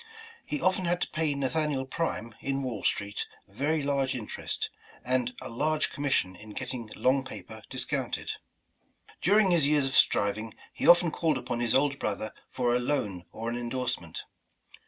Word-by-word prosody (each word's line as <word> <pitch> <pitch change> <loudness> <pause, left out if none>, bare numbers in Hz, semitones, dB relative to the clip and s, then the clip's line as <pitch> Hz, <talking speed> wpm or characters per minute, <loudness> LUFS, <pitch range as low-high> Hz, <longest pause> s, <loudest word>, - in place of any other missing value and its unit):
He 295 - -2
often 185 -4 +2
had 175 +1 +2
to - - -1
pay 155 -2 +1
Nathaniel 140 0 0
Prime, 130 -6 -2
in 135 0 -1
Wall 120 -6 -3
Street, 100 +1 -1 0.2
very 145 +9 0
large 140 -2 +1
interest, 110 -4 -4 0.3
and 125 -1 0
^'a 115 - -7
large 155 +3 +1
commission 135 -10 0
in 105 +3 -11
getting 125 -2 -5
long 130 +1 +3
paper 110 -3 -9
discounted," - - -1 0.9
During 200 +1 +5
his 165 -5 +5
years 145 -2 +3
of 135 - -1
striving, 105 0 +3 0.2
he - - -1
often 175 -1 +7
called 155 -3 +1
upon 120 -2 -3
his 120 -2 +2
older 140 +1 +3
brother 110 -3 -2 0.2
for 120 -2 +1
a - - +3
loan 110 -9 -1
or 115 +1 -5
an 120 - -1
endorsement. 120 +1 -3
130 Hz, 160 wpm, -29 LUFS, 115-150 Hz, 0.9 s, often